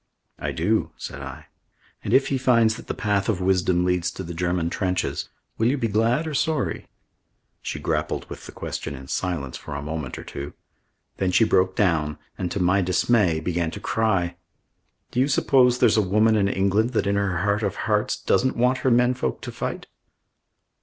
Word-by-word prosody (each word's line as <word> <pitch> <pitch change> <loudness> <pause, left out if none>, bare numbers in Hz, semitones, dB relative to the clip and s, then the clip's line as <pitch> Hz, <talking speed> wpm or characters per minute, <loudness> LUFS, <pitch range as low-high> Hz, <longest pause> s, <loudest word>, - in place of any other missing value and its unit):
"I - - -2
do," - - 0
said - - -7
I. - - -8 0.6
"And - - -3
if 135 - +4
he 135 - 0
finds 115 -4 +4
that - - -11
the - - -3
path 100 0 0
of 100 -5 0
wisdom 90 -1 +2
leads 90 -1 +1
to 95 - -6
the 85 -1 -6
German 85 0 -1
trenches 90 -1 -2 0.3
will 115 - +3
you 135 +4 +2
be 115 - 0
glad 115 +8 +1
or 155 - -4
sorry?" 155 +2 -1 0.7
She - - -4
grappled - - -2
with - - -9
the - - -9
question 70 - -5
in 65 0 -10
silence 80 -8 -2
for 70 - -8
a 70 - -4
moment 75 -3 -4
or - - -7
two. 70 +1 -7 0.6
Then 95 -1 0
she 100 - +4
broke 95 -3 +2
down 80 -6 +1 0.2
and, 90 - -3
to 100 - -3
my 90 +2 +3
dismay, 90 -1 +2
began 85 0 -1
to 100 - -7
cry. 95 -6 0 0.7
"Do 125 - -1
you 130 - +4
suppose 130 -3 +4
there's - - +4
a - - +5
woman 105 +3 +3
in 100 -2 +2
England 100 +5 +1
that, 110 - +1
in 100 0 +1
her 100 -3 0
heart 100 +1 +1
of 100 -3 -1
hearts, - - +1
doesn't 130 - +1
want 125 +2 +2
her 130 - +1
men 125 +1 +4
folk 125 - -3
to - - -6
fight?" - - -4
100 Hz, 195 wpm, -24 LUFS, 90-115 Hz, 0.7 s, a